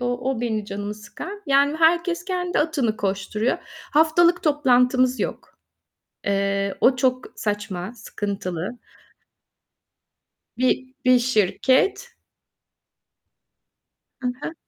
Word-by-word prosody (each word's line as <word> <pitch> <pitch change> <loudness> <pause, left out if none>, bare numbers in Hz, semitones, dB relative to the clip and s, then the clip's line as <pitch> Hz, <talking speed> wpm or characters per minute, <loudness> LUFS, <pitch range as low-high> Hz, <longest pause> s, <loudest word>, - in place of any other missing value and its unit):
o 245 +1 -1
o 245 -3 -2
benim 220 -3 -1
canımı 205 +1 -5
sıkan, 295 - -9
yani, 280 +2 +3
herkes 340 +2 +2
kendi 360 -2 -1
atını 280 -8 0
koşturuyor. 205 +4 -1 0.3
Haftalık 335 +3 +4
toplantımız 255 -3 +3
yok. - - -5 0.7
Eee, 200 0 0
o 255 +1 +5
çok 255 0 +1
saçma, 205 -1 -3
sıkıntılı. 200 -3 -5 1.8
Bir 260 +1 0
bir 255 0 +6
şirket. 255 - +2 2.1
Hı 250 - -2
hı. 325 - -4
250 Hz, 95 wpm, -23 LUFS, 210-295 Hz, 2.1 s, bir